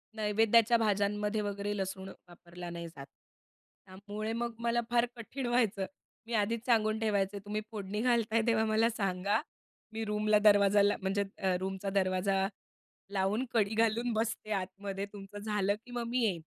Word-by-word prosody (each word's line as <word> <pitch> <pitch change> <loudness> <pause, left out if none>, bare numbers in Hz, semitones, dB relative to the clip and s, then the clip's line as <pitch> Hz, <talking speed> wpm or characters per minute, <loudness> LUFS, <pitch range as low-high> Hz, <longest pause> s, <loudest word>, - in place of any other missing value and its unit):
नैवेद्याच्या 225 +2 +4
भाज्यांमध्ये 210 0 +1
वगैरे 205 0 -2
लसूण 190 0 -4 0.2
वापरला 175 0 -10
नाही 170 0 -6
जात. 140 -4 -10 0.8
त्यामुळे 205 +3 -6
मग 235 0 -2
मला 235 0 +1
फार 240 0 +3
कठीण 250 +3 -6
व्हायचं. 225 -5 +1 0.4
मी 235 - -5
आधीच 225 +2 0
सांगून 220 -3 +3
ठेवायचे, 200 -2 0
"तुम्ही 210 +2 -3
फोडणी 210 -1 -4
घालताय 230 -2 +2
तेव्हा 225 -1 +3
मला 220 +1 +3
सांगा. 200 -1 0 0.5
मी 225 0 -3
रूमला 210 0 +2
दरवाजाला 205 0 +5
म्हणजे 195 +1 0
अ, 190 -1 +1
रूमचा 190 +1 -3
दरवाजा 195 0 +1 0.7
लावून 200 +5 +1
कडी 215 -2 +2
घालून 230 +2 +2
बसते 220 -1 -2
आतमध्ये. 195 +1 -3
तुमचं 205 0 -9
झालं 205 -1 0
की 245 - -15
मग 240 -1 -2
मी 250 +2 0
येईन." 185 -6 0
210 Hz, 150 wpm, -32 LUFS, 195-225 Hz, 0.8 s, दरवाजाला